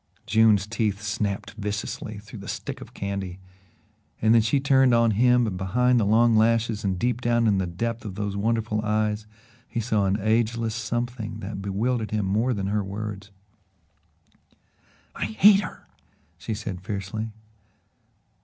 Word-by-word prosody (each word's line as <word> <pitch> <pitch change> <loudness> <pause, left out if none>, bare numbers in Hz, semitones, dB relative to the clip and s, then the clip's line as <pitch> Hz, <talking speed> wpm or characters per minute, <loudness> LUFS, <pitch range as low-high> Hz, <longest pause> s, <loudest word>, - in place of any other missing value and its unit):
June's 110 -2 +4
teeth 105 -2 -1
snapped 100 -1 -2
viciously 105 0 -4
through 105 +1 -10
the 100 - -9
stick - - -5
of - - -10
candy 100 -2 -4 0.8
and 110 +1 +4
then 115 - +6
she 115 +6 +2
turned 135 -2 +4
on 115 -1 +4
him 125 +3 +4
and 100 -5 -3
behind 125 +6 +2
the 110 - +2
long 115 +2 +4
lashes 115 0 +2
and 95 -2 0
deep 120 +4 -1
down 120 -1 +2
in 100 -3 +3
the 95 - -1
depth 115 +6 -3
of 100 -4 -6
those 100 -1 -3
wonderful 110 +1 0
eyes 105 0 0 0.4
he 120 - -3
saw 110 -3 +1
an 95 +1 +1
ageless 115 +1 +1
something 115 0 -3
that 100 0 -5
bewildered 110 +4 -1
him 105 -2 -1
more 110 +6 +1
than 100 -5 -2
her 105 +1 0
words. 100 0 -6 1.8
"I - - -3
hate 195 - +6
her," 185 - -7 0.5
she 110 +5 -5
said 95 -3 -5
fiercely. 100 +3 -4
110 Hz, 155 wpm, -25 LUFS, 100-115 Hz, 1.8 s, then